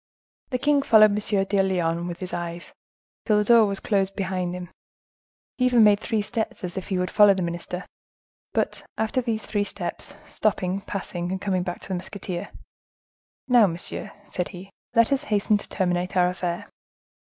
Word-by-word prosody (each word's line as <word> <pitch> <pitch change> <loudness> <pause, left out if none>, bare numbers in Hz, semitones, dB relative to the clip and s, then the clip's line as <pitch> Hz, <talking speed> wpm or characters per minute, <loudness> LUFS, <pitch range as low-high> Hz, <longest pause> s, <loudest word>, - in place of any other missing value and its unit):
The 255 - 0
king 285 +2 +3
followed 215 -5 +6
M. 205 -1 +1
de 195 0 +2
Lyonne 175 -3 0
with 175 +1 -6
his 185 - -5
eyes, 170 0 -5 0.5
till 210 -2 +3
the 210 - +3
door 230 0 +6
was 200 -1 -3
closed 195 -2 0
behind 185 -2 -2
him; 180 -1 -7 0.9
he 250 - +4
even 245 -3 +5
made 205 -1 +6
three 220 -1 -1
steps, 220 -1 -3
as 180 -1 -4
if 190 - -5
he 190 - -1
would 180 0 -1
follow 205 -2 +6
the 185 - -1
minister; 175 +2 -4 0.7
but, - - -1
after 220 +4 0
these 225 -3 -2
three 205 -1 0
steps, - - -5
stopping, 195 -2 -1
passing, 180 -3 -4
and 190 - -2
coming 185 -2 0
back 175 0 -4
to - - -11
the - - -1
musketeer,—"Now, 200 +5 -2
monsieur," 170 0 -5 0.2
said 180 -2 -2
he, 190 +1 -10 0.2
"let 230 +2 +5
us 275 - +1
hasten 210 0 +2
to - - -8
terminate 180 0 -1
our 180 0 +4
affair. 180 -1 -3
195 Hz, 180 wpm, -25 LUFS, 180-215 Hz, 0.9 s, followed